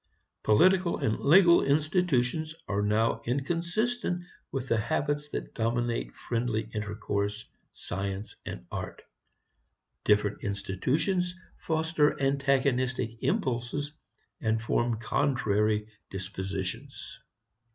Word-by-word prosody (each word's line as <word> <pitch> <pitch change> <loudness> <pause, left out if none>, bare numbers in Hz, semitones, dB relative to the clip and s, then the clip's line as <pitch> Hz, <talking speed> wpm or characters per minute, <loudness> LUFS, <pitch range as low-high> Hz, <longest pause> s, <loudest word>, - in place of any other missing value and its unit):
Political 185 - +4
and 110 - 0
legal 170 +3 +7
institutions 155 -1 +1
are 100 0 0
now 105 +2 +2
inconsistent 175 - -1 0.3
with 135 -1 -3
the 115 - +2
habits 145 +5 -1
that - - -5
dominate 115 - -1
friendly 115 -2 -1
intercourse, 105 0 -2 0.3
science 100 +2 -4
and - - -7
art. - - -5 1.0
Different 105 +1 +2
institutions 145 - 0 0.2
foster 160 -2 +1
antagonistic 135 -3 +1
impulses 145 - -1 0.5
and 110 0 +1
form 115 0 0
contrary 110 -4 +1 0.2
dispositions. 95 -1 -5
125 Hz, 90 wpm, -29 LUFS, 105-155 Hz, 1.0 s, legal